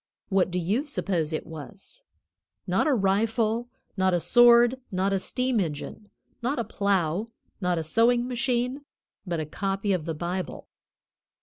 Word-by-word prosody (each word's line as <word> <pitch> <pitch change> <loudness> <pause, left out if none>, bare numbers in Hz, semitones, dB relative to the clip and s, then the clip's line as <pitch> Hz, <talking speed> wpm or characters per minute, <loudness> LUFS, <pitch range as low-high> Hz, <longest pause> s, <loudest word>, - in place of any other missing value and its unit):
What 190 -2 +2
do 180 - -3
you 195 - 0
suppose 185 - -1
it 155 - -3
was? 170 - -11 0.6
Not - - +1
a 295 - +3
rifle, 225 +3 +1 0.3
not 190 -2 +2
a - - +2
sword, 240 +4 +6
not 190 +1 0
a 195 - +1
steam 250 +3 0
engine, 170 +4 -4 0.3
not 255 +5 -1
a 235 - 0
plow, 200 -2 0 0.3
not 180 -2 +1
a 165 - -1
sewing 235 +8 +2
machine, 250 +2 -1 0.4
but 170 -2 -1
a 155 - -2
copy 195 +5 -1
of 170 -4 -2
the 165 -1 -3
Bible. 175 +2 -4
200 Hz, 150 wpm, -26 LUFS, 180-240 Hz, 0.6 s, sword